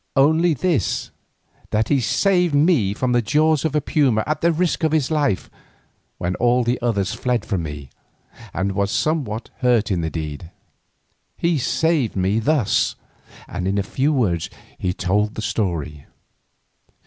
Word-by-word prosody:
"Only 160 +4 +4
this, 145 - -1 0.6
that 110 +1 0
he 140 - +3
saved 180 - +2
me 145 - +3
from 130 +2 -1
the 120 0 +3
jaws 155 +6 +2
of 160 -2 -1
a 150 - +2
puma 130 -8 +2
at 155 0 -2
the 170 - +3
risk 170 0 0
of 160 -1 +2
his 155 -2 +1
life 145 -10 0 0.7
when 90 +1 -2
all 125 +1 +3
the 120 +2 -1
others 100 -6 0
fled 125 -2 -1
from 95 -5 -1
me, 75 -4 -7 0.6
and 95 +3 -1
was 100 +1 0
somewhat 125 -4 -1
hurt 120 -4 +2
in 90 -3 0
the 80 - -2
deed. 80 0 -6 0.9
He 170 -3 +1
saved 145 -1 +1
me 95 +3 +1
thus—" 130 -2 +1 0.5
and 90 - -4
in 100 +1 0
few 135 +9 0
words 95 - 0 0.3
he 90 - 0
told 100 +4 0
the - - -4
story. 80 -10 -3
120 Hz, 155 wpm, -21 LUFS, 95-155 Hz, 0.9 s, Only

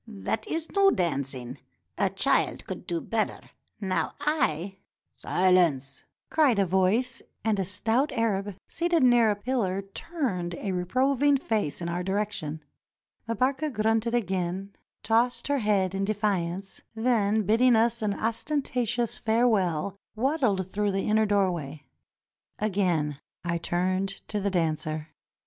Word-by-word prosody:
That 220 0 -3
is 325 0 -2
no 395 -1 +5
dancing. 135 - -2 0.4
A - - +1
child - - +1
could - - -7
do 170 -1 -1
better. 225 +4 -3 0.3
Now 190 -3 -1
I 195 - 0
— - - -68
" - - -56
"Silence! 170 -8 +1
" - - -60
cried 290 -8 +4
a 200 - +3
voice, 190 +7 +1 0.2
and 215 -3 +2
a 190 - 0
stout 225 - 0
Arab 205 -5 -1
seated 340 -3 +1
near 240 -3 +5
a 210 - +2
pillar 205 -4 -1
turned 195 - -3
a 195 +2 -3
reproving 265 +10 +2
face 215 - -2
in - - -2
our 170 +1 -2
direction. 190 -6 -2 0.7
Mbarka 265 +7 0
grunted 225 +1 +1
again, 190 -2 -2 0.3
tossed 235 +3 +1
her 285 -1 +2
head 200 -4 +1
in 195 0 -1
defiance, 195 -3 -1
then 220 -2 +2
bidding 230 +5 +4
us 225 +1 +2
an 205 -2 0
ostentatious 240 -1 -1
farewell, 200 -7 +1 0.2
waddled 235 - +1
through 205 -1 0
the 195 - -1
inner 215 0 +3
doorway. 175 -8 0 0.7
Again 180 -9 0 0.3
I 170 0 0
turned 185 +3 0 0.2
to 210 - -1
the 200 0 0
dancer. 155 -3 -1
205 Hz, 135 wpm, -27 LUFS, 180-235 Hz, 0.7 s, no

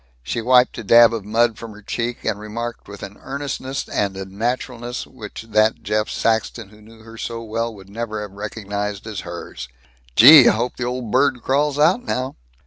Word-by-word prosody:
She 90 - -3
wiped 125 +1 +4
a - - -6
dab 115 +2 +6
of 110 -4 -4
mud 115 +1 +1
from 115 -2 -8
her 105 0 -15
cheek, 120 +3 -4
and 100 - -1
remarked 115 +3 -6
with 100 0 -10
an 100 - -9
earnestness 140 -1 -4
and 100 -2 -2
a 95 - -5
naturalness 120 +4 -4
which 110 -3 -10
that 110 +1 +2
Jeff 105 0 -1
Saxton 110 -1 -1
who 105 +1 -18
knew 110 +1 -17
her 115 0 -12
so 115 -1 -5
well 115 +1 -3
would 95 -1 -14
never 110 0 -4
have 105 - -8
recognized 105 0 -5
as 110 -4 -5
hers: 85 -7 -8 0.5
"Gee, 135 +3 +10
I - - +3
hope 120 +3 -2
the 120 - -3
old 125 -3 -4
bird 130 -1 +2
crawls 145 +1 +1
out 170 +11 +3
now." 130 - -3
115 Hz, 195 wpm, -21 LUFS, 105-125 Hz, 0.5 s, Gee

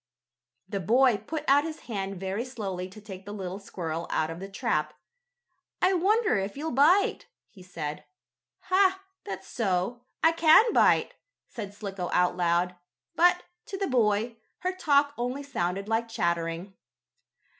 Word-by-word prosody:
The 200 +1 -3
boy 240 +5 +4
put 295 +9 -5
out 280 +2 +5
his 320 0 -6
hand 195 -4 -4
very 190 +4 -2
slowly 195 -8 -5
to 190 - -12
take 195 -3 -10
the 205 - -8
little 190 -2 -5
squirrel 170 -4 -5
out 160 0 0
of 165 - -7
the 195 +1 -7
trap. 195 - -1 0.8
"I 370 +1 +3
wonder 405 - +2
if 195 +5 -4
you'll 315 +3 -3
bite," 305 +10 +3 0.2
he 190 - -16
said. 155 -5 -6 0.6
"Ha! 380 0 +2 0.2
That's 190 -1 -6
so. 200 +2 -1 0.2
I 325 - +6
can 335 +8 +6
bite!" - - +4 0.3
said 205 -4 -7
Slicko 195 -4 -5
out 180 0 +3
loud, 175 0 +1 0.4
but, 355 +1 +4 0.2
to 390 - -5
the 390 - -1
boy, 230 - +1 0.2
her 370 +1 -1
talk 285 -5 +3
only 250 +4 -2
sounded 195 -7 -2
like 225 +1 0
chattering. 170 -2 -2
210 Hz, 150 wpm, -27 LUFS, 185-285 Hz, 0.8 s, I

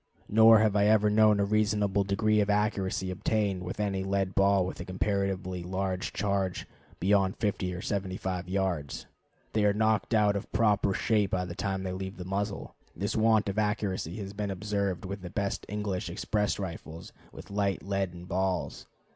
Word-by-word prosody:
Nor 110 +1 +7
have 110 -1 +2
I 100 0 +4
ever 105 -1 +4
known 105 -1 +5
a 100 - +3
reasonable 105 -1 +1
degree 105 +2 +2
of 105 - 0
accuracy 100 -3 0
obtained 100 0 0
with 90 +3 -6
any 100 -2 -1
lead 95 -1 -1
ball 100 -1 +3
with 95 - -6
a - - -4
comparatively 95 -1 -2
large 95 +1 -2
charge, 100 -3 -1 0.3
beyond 95 0 +2
50 100 -4 -1
or 90 - -6
75 95 -2 -3
yards. 90 -7 -2 0.5
They 110 - +2
are 105 -1 +4
knocked 110 +1 +1
out 105 -2 +3
of 100 - -5
proper 105 -3 +2
shape 105 -3 +1
by 90 -1 -1
the 90 - -6
time 95 0 -2
they 95 -1 -3
leave 95 +1 -5
the 90 - -7
muzzle. 100 +2 -3 0.2
This 100 +4 -2
want 110 -1 +3
of 100 +2 -1
accuracy 105 -5 -1
has 100 -2 -6
been 105 0 -3
observed 100 -1 -2
with 100 +1 -5
the 90 - -7
best 100 +2 -3
English 100 -3 -3
express 105 +4 -1
rifles 85 -3 -7 0.2
with 100 - -11
light 100 -1 0
leaden 95 -3 -3
balls. 95 0 -2
100 Hz, 175 wpm, -29 LUFS, 95-105 Hz, 0.5 s, Nor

